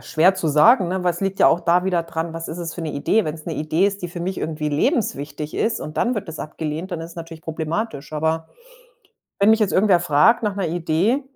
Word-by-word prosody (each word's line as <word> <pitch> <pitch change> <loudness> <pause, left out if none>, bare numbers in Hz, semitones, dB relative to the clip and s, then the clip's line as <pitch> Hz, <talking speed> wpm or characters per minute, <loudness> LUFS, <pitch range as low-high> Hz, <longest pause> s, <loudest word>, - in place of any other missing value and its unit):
schwer 180 +5 +3
zu 175 - -2
sagen, 180 - +5
ne? 185 0 -2
Weil 180 - +2
es 175 - -5
liegt 195 0 -2
ja - - +7
auch 170 - +3
da 175 +1 +2
wieder 180 -3 +1
dran, 165 0 -4
was 165 0 -6
ist 165 - -6
es 170 -1 -4
für 175 - -6
'ne 155 -2 -3
Idee? 210 +9 +1
Wenn's 155 0 -5
'ne 165 - -3
Idee 155 +5 +1
ist, 200 -2 -3
die 175 - -3
für 175 0 -7
mich 185 +1 -3
irgendwie 155 -1 -3
lebenswichtig 150 - -1
ist 225 - 0
und 155 - -7
dann 245 +1 +1
wird 200 -4 -5
das 160 - -7
abgelehnt, 160 +4 -5
dann 165 - -3
ist 165 +1 -7
es 170 - -15
natürlich 165 -1 -9
problematisch. 160 -1 -4
Aber 160 +1 -1 0.9
wenn 200 +2 +5
mich 220 0 +4
jetzt 205 - +2
irgendwer 190 -3 +4
fragt 175 +9 +4
nach 205 -2 -1
'ner 190 -3 -1
Idee 175 - 0
170 Hz, 250 wpm, -21 LUFS, 160-195 Hz, 0.9 s, ja